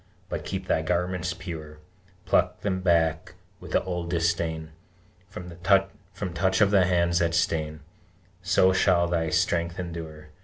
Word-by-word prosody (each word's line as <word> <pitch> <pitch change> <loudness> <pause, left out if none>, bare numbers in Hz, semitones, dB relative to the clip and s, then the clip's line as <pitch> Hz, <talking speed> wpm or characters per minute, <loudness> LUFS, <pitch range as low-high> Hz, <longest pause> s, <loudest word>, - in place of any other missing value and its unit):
But - - -4
keep - - -4
thy - - +1
garments 90 0 -1
pure: 80 -4 -8 0.5
Pluck 90 +1 +1
them 95 -2 -1
back, 80 -3 +1 0.2
with - - -10
the - - +3
old 90 -2 -4
disdain, 85 -2 -1 0.6
From 90 -3 -8
touch 95 -1 0
of 100 -1 +4
the 95 -3 +4
hands 85 -1 +2
that 85 0 +1
stain! 80 -2 -1 0.6
So 95 0 +3
shall 90 -2 +3
thy 85 -2 0
strength 85 +1 0
endure. 80 -4 -7
85 Hz, 140 wpm, -26 LUFS, 85-90 Hz, 0.6 s, of